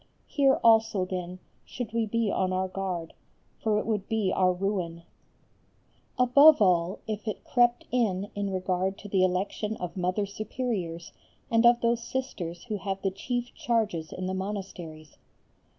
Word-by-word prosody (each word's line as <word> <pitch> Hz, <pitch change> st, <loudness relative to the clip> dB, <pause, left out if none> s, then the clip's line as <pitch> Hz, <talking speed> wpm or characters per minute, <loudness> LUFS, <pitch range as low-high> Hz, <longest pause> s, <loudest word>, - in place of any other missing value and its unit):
Here 275 Hz, -2 st, +3 dB
also 225 Hz, -4 st, +4 dB
then 180 Hz, -1 st, -5 dB, 0.3 s
should 245 Hz, -2 st, -6 dB
we 230 Hz, -1 st, 0 dB
be 225 Hz, -1 st, 0 dB
on 185 Hz, -1 st, 0 dB
our 185 Hz, 0 st, 0 dB
guard, 185 Hz, -3 st, -4 dB, 0.5 s
for 215 Hz, -1 st, +1 dB
it -, -, -1 dB
would 210 Hz, -3 st, -2 dB
be 220 Hz, -4 st, +1 dB
our 185 Hz, -1 st, +4 dB
ruin; 180 Hz, -3 st, -2 dB, 1.1 s
above 280 Hz, +5 st, +7 dB
all 180 Hz, -2 st, +2 dB
if 215 Hz, +1 st, -5 dB
it 215 Hz, -, -4 dB
crept 240 Hz, -1 st, +2 dB
in 205 Hz, -5 st, 0 dB
in 200 Hz, -1 st, -2 dB
regard 185 Hz, 0 st, -1 dB
to 205 Hz, -, -10 dB
the 195 Hz, -2 st, +2 dB
election 195 Hz, +4 st, -1 dB
of 180 Hz, -1 st, -5 dB
Mother 185 Hz, +2 st, 0 dB
Superiors 200 Hz, -5 st, -4 dB, 0.4 s
and 230 Hz, +1 st, +5 dB
of 240 Hz, 0 st, +5 dB
those 235 Hz, 0 st, +1 dB
Sisters 185 Hz, -10 st, -4 dB
who 215 Hz, -3 st, -3 dB
have 195 Hz, 0 st, -3 dB
the 195 Hz, -, +1 dB
chief 245 Hz, +5 st, -4 dB
charges 220 Hz, -, -1 dB
in 185 Hz, -, -5 dB
the 185 Hz, -, -2 dB
monasteries. 190 Hz, -6 st, -6 dB
200 Hz, 155 wpm, -28 LUFS, 185-230 Hz, 1.1 s, above